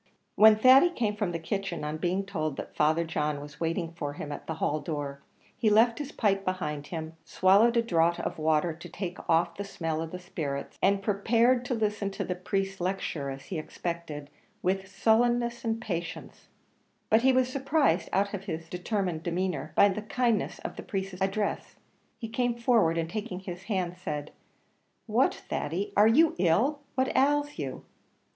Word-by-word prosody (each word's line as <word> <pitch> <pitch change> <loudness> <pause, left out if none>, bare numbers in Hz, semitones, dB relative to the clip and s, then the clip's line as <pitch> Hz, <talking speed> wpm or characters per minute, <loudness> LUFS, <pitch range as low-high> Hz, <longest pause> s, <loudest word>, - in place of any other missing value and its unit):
When 220 0 +8
Thady 260 +9 +7
came 225 -11 -1
from 210 -4 -1
the 170 - -2
kitchen, 195 0 -3
on 150 +1 -3
being 185 +4 -1
told 155 -7 -3
that - - -7
Father 155 +2 +3
John 150 -2 -2
was 145 +1 -11
waiting 165 0 -1
for 145 -4 -4
him 145 0 -6
at - - -7
the 160 - -3
hall 155 -1 0
door, 145 -4 -5 0.3
he 220 - +2
left 225 +4 +4
his 285 -1 -5
pipe 195 -3 +1
behind 165 -6 -3
him, 160 -1 -5
swallowed 205 +6 +4
a 230 - +4
draught 170 -5 +2
of - - -4
water 155 +2 +2
to 170 +2 -11
take 180 +1 -5
off 170 +1 +3
the 200 - -3
smell 165 -5 -3
of 165 - -4
the 180 - -6
spirits, 155 -6 -5
and 195 0 +3
prepared 230 +5 +3
to 245 - -1
listen 210 -2 -1
to 195 - -4
the 180 - -2
priest's 195 +1 -3
lecture, 175 -6 -2
as 135 0 -7
he 180 - -4
expected, 155 -3 -5 0.3
with 190 +1 0
sullenness 235 +3 +2
and 225 -1 -1
patience; 175 -7 -6 0.6
but 220 - +6
he 265 +2 +5
was 255 -1 +3
surprised 270 - +1
out 200 +2 +1
of 195 -1 -5
his 165 -3 -5
determined 180 -2 -2
demeanour 170 -4 -2
by 200 - +7
the 205 +1 -2
kindness 230 +1 0
of - - -5
the - - -5
priest's 195 -4 -4
address. 195 +2 -1 0.4
He 225 - -5
came 240 +1 0
forward, 230 -9 +3
and 165 -1 0
taking 195 -1 -5
his 185 0 -8
hand, 180 -4 -2
said, 150 0 -4 0.7
"What, - - +2
Thady, 195 +6 -3
are 210 +1 +6
you 310 +8 +5
ill? 210 - +2 0.2
What 260 0 0
ails 290 +2 +2
you?" 135 -3 -5
190 Hz, 180 wpm, -28 LUFS, 165-220 Hz, 0.7 s, When